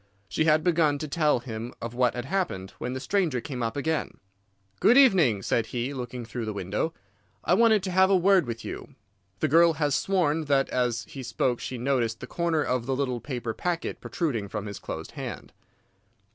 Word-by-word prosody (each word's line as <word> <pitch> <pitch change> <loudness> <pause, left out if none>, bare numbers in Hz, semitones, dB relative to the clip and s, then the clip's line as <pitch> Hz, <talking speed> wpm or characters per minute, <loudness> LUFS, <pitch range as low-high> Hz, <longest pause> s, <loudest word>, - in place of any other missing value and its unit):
She 155 - 0
had 155 0 +4
begun 160 -4 +3
to 155 - -5
tell 150 -4 +2
him 115 -1 -6
of 115 0 -5
what 125 -1 +2
had 125 0 -4
happened, 130 - -2
when 125 - -3
the 130 - -3
stranger 160 -2 0
came 125 0 -6
up 115 +3 -2
again. 160 +2 -2 0.6
"'Good 240 - +5
evening,' 175 - +5
said 115 -1 0
he, 125 +4 -3
looking 125 -2 -5
through 115 0 -5
the 110 - -3
window. 100 - -2 0.5
'I - - +2
wanted 220 -1 +4
to 190 - -2
have 190 +1 +5
a 195 - +5
word 185 -2 +4
with 115 0 -5
you.' 140 - -7 0.5
The - - +3
girl 165 +3 +5
has 145 -2 0
sworn 160 -1 +1
that 140 -1 +2
as 120 -2 0
he 135 - -8
spoke 125 0 -1
she 130 - -5
noticed 120 -3 0
the - - -6
corner 165 +1 0
of 125 -3 -1
the 135 - 0
little 130 -3 -1
paper 120 -5 -4
packet 175 +4 -3
protruding 125 - -2
from 105 0 -4
his 100 -1 -6
closed - - -6
hand. - - -7
135 Hz, 200 wpm, -27 LUFS, 120-165 Hz, 0.6 s, Good